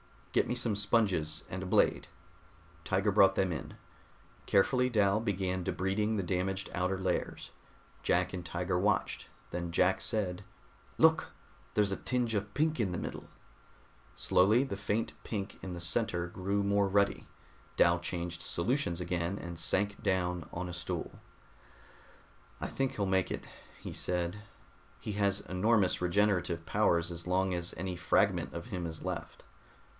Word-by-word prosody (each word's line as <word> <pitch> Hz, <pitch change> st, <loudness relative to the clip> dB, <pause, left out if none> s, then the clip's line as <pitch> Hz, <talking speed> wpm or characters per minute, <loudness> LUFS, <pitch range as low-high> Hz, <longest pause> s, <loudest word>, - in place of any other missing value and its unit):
"Get -, -, +3 dB
me 125 Hz, -, -1 dB
some 115 Hz, -4 st, +1 dB
sponges 95 Hz, -8 st, +1 dB
and 95 Hz, -, -4 dB
a -, -, -4 dB
blade." -, -, +3 dB, 0.8 s
Tiger 95 Hz, +2 st, +2 dB
brought 95 Hz, -1 st, +6 dB
them 95 Hz, -2 st, +1 dB
in. 75 Hz, -6 st, -5 dB, 0.7 s
Carefully 125 Hz, +6 st, +3 dB
Dal 105 Hz, -3 st, +3 dB
began 95 Hz, -4 st, -1 dB
debriding 100 Hz, +5 st, 0 dB
the 100 Hz, -, 0 dB
damaged 95 Hz, +2 st, -1 dB
outer 90 Hz, +2 st, 0 dB
layers. 95 Hz, -2 st, -2 dB, 0.5 s
Jack -, -, +1 dB
and 90 Hz, -1 st, -4 dB
Tiger 90 Hz, +1 st, -1 dB
watched; 105 Hz, +3 st, 0 dB, 0.2 s
then 85 Hz, 0 st, -3 dB
Jack 90 Hz, +2 st, +3 dB
said, 95 Hz, -5 st, -1 dB, 0.5 s
"Look, -, -, +4 dB, 0.4 s
there's 105 Hz, -2 st, +2 dB
a 95 Hz, -, -1 dB
tinge 125 Hz, -3 st, -1 dB
of 100 Hz, -1 st, -2 dB
pink 155 Hz, 0 st, +1 dB
in 95 Hz, -6 st, +1 dB
the -, -, -2 dB
middle." -, -, -5 dB, 0.9 s
Slowly 105 Hz, +8 st, +4 dB
the 115 Hz, -8 st, -4 dB
faint 105 Hz, +3 st, -1 dB
pink 100 Hz, -3 st, -4 dB
in 95 Hz, -, -5 dB
the 85 Hz, -, -6 dB
center 90 Hz, -1 st, +1 dB
grew 100 Hz, +3 st, -1 dB
more 100 Hz, 0 st, +3 dB
ruddy. 100 Hz, 0 st, +1 dB, 0.5 s
Dal 85 Hz, 0 st, +4 dB
changed 85 Hz, 0 st, -4 dB
solutions 90 Hz, -2 st, 0 dB
again, 85 Hz, +2 st, -1 dB
and 85 Hz, -3 st, -7 dB
sank 100 Hz, +4 st, 0 dB
down 90 Hz, -3 st, 0 dB
on 90 Hz, +1 st, -3 dB
a -, -, -6 dB
stool. 85 Hz, 0 st, -4 dB, 1.4 s
"I -, -, -1 dB
think 135 Hz, -1 st, -1 dB
he'll 100 Hz, -, -1 dB
make 95 Hz, -1 st, +1 dB
it," -, -, -4 dB, 0.4 s
he -, -, -6 dB
said. 90 Hz, +3 st, -2 dB, 0.6 s
"He -, -, -5 dB
has 100 Hz, -1 st, +1 dB
enormous 100 Hz, +1 st, +2 dB
regenerative 90 Hz, -2 st, +1 dB
powers 85 Hz, -3 st, +2 dB
as 85 Hz, +1 st, -6 dB
long 95 Hz, +1 st, +1 dB
as 85 Hz, 0 st, -2 dB
any 90 Hz, +1 st, -3 dB
fragment 90 Hz, 0 st, +2 dB
of 85 Hz, +6 st, -6 dB
him 90 Hz, -7 st, -3 dB
is 80 Hz, -1 st, -7 dB
left." 85 Hz, -2 st, -5 dB
95 Hz, 150 wpm, -32 LUFS, 90-105 Hz, 1.4 s, brought